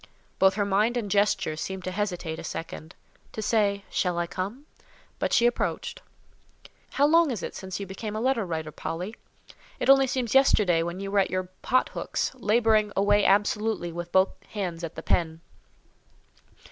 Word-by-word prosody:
Both 190 0 +5
her 205 -1 0
mind 210 +5 +2
and 210 -5 -3
gesture 200 -6 +2
seemed 190 +4 -5
to 185 - -3
hesitate 180 -5 -3
a - - -7
second—to 165 +5 -9
say 205 -2 +1
"Shall 180 -2 0
I 175 - 0
come?"—but 200 - -7
she 235 - +4
approached. 475 - -1 0.9
"How 280 - +3
long 330 +1 +5
is 230 -8 -3
it - - -5
since 190 0 -6
you 200 - -4
became 210 +3 -6
a - - -2
letter 255 -1 +1
writer, 160 -4 -4
Polly? 180 +8 -5 0.6
It - - +5
only 270 0 +5
seems 250 -3 -2
yesterday 210 -10 +4
when 170 +2 -4
you 195 0 -5
were 200 - +3
at 195 - +2
your 185 0 -2
pot 255 +1 +2
hooks, - - -2
labouring 220 -3 +2
away 205 +1 +3
absolutely 210 -2 +1
with 175 +1 -6
both 190 +1 +4 0.2
hands 180 -5 -4
at 165 -1 -5
the - - -7
pen." 160 -2 0
200 Hz, 170 wpm, -26 LUFS, 180-225 Hz, 0.9 s, Both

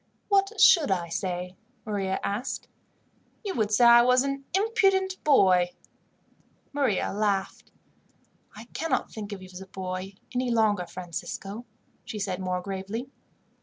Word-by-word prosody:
"What 400 +1 +2
should 325 - +7
I 175 -3 0
say?" 180 +1 -3 0.3
Maria 195 -3 -1
asked. 205 +5 -3 0.8
"You 390 - -2
would 215 -3 0
say 225 +3 +5
I 235 0 +9
was 250 +1 +4
an 275 0 -3
impudent 390 -3 +2
boy." 185 -11 +4 1.0
Maria 265 -12 0
laughed. 200 -2 -1 0.8
"I 215 +2 -10
cannot 325 0 -1
think 210 -1 -7
of 195 -2 -7
you 185 - -11
as 180 - -8
a 190 - -10
boy 185 +1 -5 0.2
any 250 0 0
longer, 215 -6 +2
Francisco," 195 +5 -6 0.4
she 215 - -6
said 195 -3 -2
more 185 -1 -2
gravely. 200 +7 -5
205 Hz, 135 wpm, -27 LUFS, 190-255 Hz, 1.0 s, I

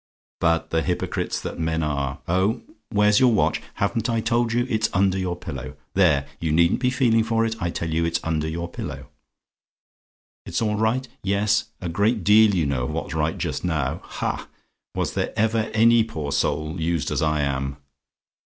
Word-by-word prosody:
But 85 -1 +1
the 80 - +2
hypocrites 90 +1 -2
that - - -5
the - - -4
men 80 0 0
are 70 -2 -2
oh! 95 +7 +1 0.3
"WHERE'S 105 0 +4
YOUR 125 -2 +5
WATCH? 105 - +2
"Haven't 110 +3 -1
I 115 -1 +1
told 115 +1 +1
you? 120 +1 +1
It's 110 -3 0
under 95 0 +2
your 90 -2 -2
pillow 70 -7 -7 0.2
there, 80 -8 +3
you 80 -2 -1
needn't 85 +2 +3
be 125 0 +2
feeling 120 -4 +3
for 115 0 +1
it. 115 0 -2
I 85 - 0
tell 85 -1 -3
you 85 +1 +1
it's 85 0 0
under 80 -1 -1
your 85 +2 -3
pillow. 85 - -7 1.4
"IT'S - - -1
ALL 110 -2 0
RIGHT? 115 +4 +1
"Yes; 100 +2 +1
a 90 - -4
great 100 +5 +1
deal 105 +1 +6
you 85 -4 +1
know 65 -3 -1
of - - -3
what's - - -4
right 80 0 0
just - - -3
now! 75 -7 -1
Ha! - - -4 0.5
was - - -1
there - - -2
ever 110 +1 +1
any 115 +1 +5
poor 80 -10 -5
soul 75 +4 -1
used 85 -1 0
as - - 0
I 75 -1 +1
am! 70 0 -2
90 Hz, 190 wpm, -23 LUFS, 80-110 Hz, 1.4 s, deal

